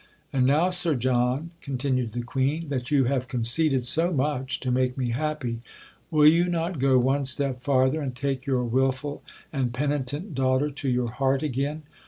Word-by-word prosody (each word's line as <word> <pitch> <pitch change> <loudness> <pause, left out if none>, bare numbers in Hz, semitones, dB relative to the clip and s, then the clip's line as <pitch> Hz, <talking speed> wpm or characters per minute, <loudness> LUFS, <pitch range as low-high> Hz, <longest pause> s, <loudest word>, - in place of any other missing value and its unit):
"And 130 -2 +2
now, 160 +7 +3
Sir 175 -4 +1
John," 125 +5 0
continued 130 -4 -2
the 120 0 -3
Queen, 140 +6 -2
"that 130 -1 -3
you 145 -3 +3
have 130 0 -1
conceded 125 +3 +2
so 165 +7 +5
much 140 -3 -1
to 130 - -2
make 125 0 0
me 125 -3 -1
happy, 130 -3 -3 0.5
will 155 -3 +4
you 165 +3 +6
not 170 -1 -2
go 135 0 +4
one 135 +3 +2
step 135 -1 -1
farther 130 +2 +2
and 130 -3 -4
take 135 +1 -3
your 130 -2 +1
wilful 130 +4 -1 0.3
and 130 -4 -1
penitent 145 - -3
daughter 130 +2 +1
to 140 -1 -3
your 125 -2 0
heart 135 +3 0
again?" 145 +2 -2
135 Hz, 175 wpm, -25 LUFS, 125-150 Hz, 0.5 s, you